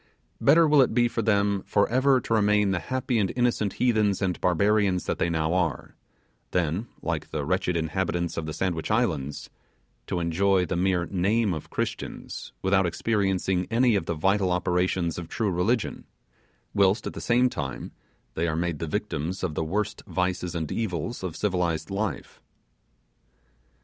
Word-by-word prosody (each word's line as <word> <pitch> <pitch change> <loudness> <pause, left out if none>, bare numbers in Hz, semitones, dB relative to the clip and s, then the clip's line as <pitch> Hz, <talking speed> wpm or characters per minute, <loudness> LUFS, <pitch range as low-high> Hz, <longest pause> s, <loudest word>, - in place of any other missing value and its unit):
Better 160 +4 +6
will 150 -2 +6
it 125 - +2
be 120 -1 +4
for 115 0 -2
them 100 -2 +2
for 100 - +3
ever 130 +2 +3
to 115 - -3
remain 105 -2 +3
the 90 - 0
happy 130 0 -1
and 95 -3 +1
innocent 120 -5 +1
heathens 110 -5 +2
and 95 -3 -1
barbarians 100 0 +2
that - - -3
they 85 - +1
now 80 0 0
are, 90 -6 -1 0.5
than, 90 +6 -1 0.2
like - - -2
the 75 -2 -3
wretched 90 +1 0
inhabitants 85 +1 -1
of 80 -1 -3
the - - -3
Sandwich 85 -3 -2
Islands, 80 - -1 0.6
to 90 - -1
enjoy 90 +3 +2
the - - -2
mere 90 -1 +1
name 100 +3 +1
of 80 - -6
Christians - - -5
without 95 -1 +3
experiencing 95 -1 0
any 120 0 +3
of 100 - -1
the 85 - -1
vital 95 +3 +2
operations 90 -1 0
of 85 - -7
true 110 -5 -1
religion, 100 +7 0 0.7
whilst, 100 +2 +3
at - - -4
the - - -7
same 125 +1 +3
time, 70 - -5 0.4
they 85 +2 -1
are 80 - -1
made 85 -2 -2
the 80 - -3
victims 90 -1 -3
of 85 -4 -1
the 80 - -1
worst 100 +6 -2
vices 90 -1 -1
and 80 -3 -3
evils 110 +1 -3
of 90 -4 -4
civilized 90 -5 -1
life. 100 +1 -4
95 Hz, 165 wpm, -26 LUFS, 85-105 Hz, 0.7 s, Better